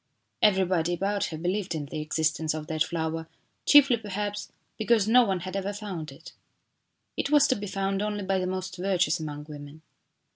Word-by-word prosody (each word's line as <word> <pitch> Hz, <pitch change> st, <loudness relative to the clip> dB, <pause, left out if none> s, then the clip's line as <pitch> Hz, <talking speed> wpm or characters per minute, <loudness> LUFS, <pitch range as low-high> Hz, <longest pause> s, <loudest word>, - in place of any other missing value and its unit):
Everybody 185 Hz, -4 st, +3 dB
about 200 Hz, +2 st, 0 dB
her 160 Hz, -, -5 dB
believed 180 Hz, +2 st, -2 dB
in 150 Hz, -2 st, -3 dB
the 150 Hz, +2 st, -5 dB
existence 155 Hz, 0 st, 0 dB
of 155 Hz, -1 st, -5 dB
that 155 Hz, 0 st, 0 dB
flower, 160 Hz, -1 st, -3 dB, 0.4 s
chiefly, 280 Hz, -4 st, +7 dB
perhaps 205 Hz, -1 st, -4 dB, 0.2 s
because 220 Hz, -2 st, +2 dB
no 245 Hz, +3 st, +6 dB
one 190 Hz, -5 st, -1 dB
had 185 Hz, +2 st, -6 dB
ever 195 Hz, +1 st, -2 dB
found 195 Hz, -7 st, -6 dB
it. -, -, -13 dB, 0.8 s
It -, -, -1 dB
was 295 Hz, 0 st, +5 dB
to 260 Hz, -, +3 dB
be 205 Hz, -2 st, -5 dB
found 195 Hz, 0 st, -1 dB
only 210 Hz, -1 st, -2 dB
by 190 Hz, 0 st, 0 dB
the 185 Hz, -, -1 dB
most 185 Hz, 0 st, -4 dB
virtuous 180 Hz, -1 st, +1 dB
among 150 Hz, -2 st, -5 dB
women. 145 Hz, +1 st, -10 dB
185 Hz, 180 wpm, -27 LUFS, 160-205 Hz, 0.8 s, chiefly